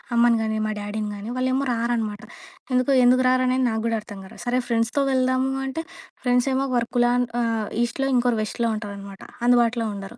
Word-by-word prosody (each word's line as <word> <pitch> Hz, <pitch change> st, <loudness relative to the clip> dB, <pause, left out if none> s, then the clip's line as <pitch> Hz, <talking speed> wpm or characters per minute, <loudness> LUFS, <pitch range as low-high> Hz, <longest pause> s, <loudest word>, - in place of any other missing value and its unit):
అమ్మని 235 Hz, -1 st, +4 dB
గాని, 220 Hz, 0 st, -1 dB
మా 215 Hz, -, -2 dB
డ్యాడీని 210 Hz, +1 st, -4 dB
గాని, 205 Hz, +3 st, -6 dB
వాళ్ళేమో 260 Hz, +2 st, 0 dB
రారనమాట! 230 Hz, -2 st, -2 dB, 0.5 s
ఎందుకొ 255 Hz, +2 st, +2 dB
ఎందుకు 255 Hz, +1 st, +5 dB
రారనేది 255 Hz, 0 st, +2 dB
నాకు 220 Hz, -1 st, -2 dB
కూడా 230 Hz, -1 st, 0 dB
అర్థంకారు. 200 Hz, -3 st, -11 dB
సరే 245 Hz, +1 st, +1 dB
ఫ్రెండ్స్‌తో 235 Hz, +4 st, +1 dB
వెళ్దాము 260 Hz, 0 st, +1 dB
అంటే, 280 Hz, +5 st, -4 dB, 0.4 s
ఫ్రెండ్స్ 245 Hz, +1 st, +2 dB
ఏమో, 270 Hz, +1 st, 0 dB
వర్క్‌లాన్ 240 Hz, +1 st, +2 dB, 0.2 s
ఆ! -, -, +1 dB, 0.4 s
ఈస్ట్‌లో 270 Hz, +3 st, -1 dB
ఇంకోరు 240 Hz, -2 st, +2 dB
వెస్ట్‌లో 230 Hz, +2 st, -2 dB
ఉంటారనమాట. 200 Hz, -2 st, -8 dB, 0.2 s
అందుబాటులో 240 Hz, -1 st, +3 dB
ఉండరు. 200 Hz, +4 st, -8 dB
240 Hz, 160 wpm, -23 LUFS, 220-255 Hz, 0.5 s, ఎందుకు